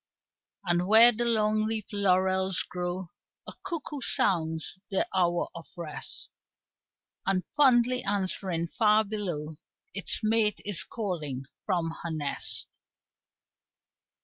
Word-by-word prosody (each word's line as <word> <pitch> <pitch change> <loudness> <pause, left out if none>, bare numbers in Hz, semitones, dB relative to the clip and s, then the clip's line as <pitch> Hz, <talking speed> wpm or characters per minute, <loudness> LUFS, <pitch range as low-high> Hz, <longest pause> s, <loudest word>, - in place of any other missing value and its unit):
And 175 0 +1
where 225 +3 +8
the 240 +1 -2
long 215 -2 +2
leaf 220 -2 -4
laurels 190 -1 +2
grow 180 0 -5 0.3
A - - -5
cuckoo 315 -6 -5
sounds 160 -5 +1
the 195 - 0
hour 175 -2 +1
of 170 - -10
rest, 165 -3 -6 1.0
And 190 -1 +1
fondly 255 -3 +4
answering 185 -4 -2
far 215 0 +3
below 175 -8 -5 0.4
Its 200 +1 -1
mate 215 -1 +2
is 205 -4 +2
calling 155 - -4 0.2
from 175 -4 0
her 170 - -4
nest. 155 -3 0
190 Hz, 110 wpm, -28 LUFS, 175-215 Hz, 1.0 s, where